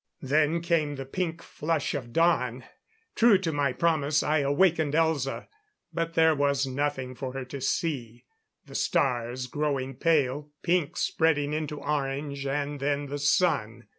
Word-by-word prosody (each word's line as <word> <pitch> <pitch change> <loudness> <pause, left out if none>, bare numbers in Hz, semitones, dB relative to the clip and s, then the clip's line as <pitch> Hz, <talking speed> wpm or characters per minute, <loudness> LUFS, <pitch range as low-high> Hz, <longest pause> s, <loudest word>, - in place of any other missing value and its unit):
Then 155 +4 +2
came 165 -4 0
the 135 -1 -6
pink 165 +3 -3
flush 155 -1 -2
of 125 -5 -5
dawn. 130 -5 +2 0.5
True 230 -3 +5
to 175 -3 -2
my 145 -3 +1
promise 155 0 +1
I 155 +1 +2
awakened 150 +1 +2
Elza. 160 -5 0 0.5
But 165 0 -2
there 160 -1 +5
was 140 -1 +1
nothing 130 -1 -2
for 130 0 -6
her 135 -1 -5
to 135 +2 -7
see; 125 -5 -2 0.4
the - - -13
stars 125 -1 0
growing 135 -1 -2
pale, 145 -1 +1
pink 170 -3 +1
spreading 150 -3 +1
into 150 -1 -3
orange, 140 -1 -2
and 145 +1 -2
then 145 0 -1
the 145 +1 -4
sun. 120 - +1
145 Hz, 145 wpm, -27 LUFS, 135-160 Hz, 0.5 s, True